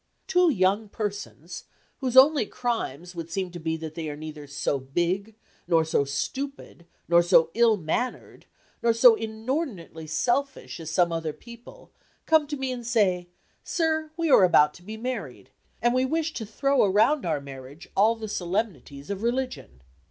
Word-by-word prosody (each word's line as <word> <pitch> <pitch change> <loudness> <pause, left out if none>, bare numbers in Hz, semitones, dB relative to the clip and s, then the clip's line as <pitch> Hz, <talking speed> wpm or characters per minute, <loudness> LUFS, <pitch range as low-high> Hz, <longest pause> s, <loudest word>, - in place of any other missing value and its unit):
Two 360 -2 +3
young 205 -3 +1
persons, 200 -5 -6 0.3
whose 260 -2 -1
only 275 -4 +7
crimes 180 - -3
would 165 -1 -7
seem 185 +1 -3
to 175 - -8
be 160 0 -2
that 160 -1 -7
they 160 -1 -5
are 145 - -5
neither 150 -1 -8
so 140 0 -1
big, 175 +10 -2 0.3
nor 165 -1 +3
so 150 -3 +1
stupid, 220 - -5 0.2
nor 170 0 +5
so 170 -2 +4
ill 230 -2 +4
mannered, 200 +9 -4 0.3
nor 235 -1 +3
so 230 +1 +7
inordinately 220 - -4
selfish 240 - -1
as 160 -1 -6
some 170 +1 +2
other 165 -2 -2
people, 235 - -14 0.3
come 315 -2 +4
to 295 0 -4
me 265 -1 -2
and 240 -2 -6
say, 190 -7 +1 0.4
sir, 315 -2 0
we 330 -3 0
are 200 - +7
about 150 -4 +5
to 175 - -15
be 215 +4 -8
married, 205 - -6 0.3
and 240 0 +3
we 255 0 +2
wish 320 +4 -1
to 220 - -5
throw 275 +5 +2
around 220 +9 +3
our 160 -4 -1
marriage 140 +2 -11
all 220 +4 +4
the 220 -1 -7
solemnities 175 - -3
of 200 0 -4
religion. 235 - -3
200 Hz, 165 wpm, -26 LUFS, 160-250 Hz, 0.4 s, only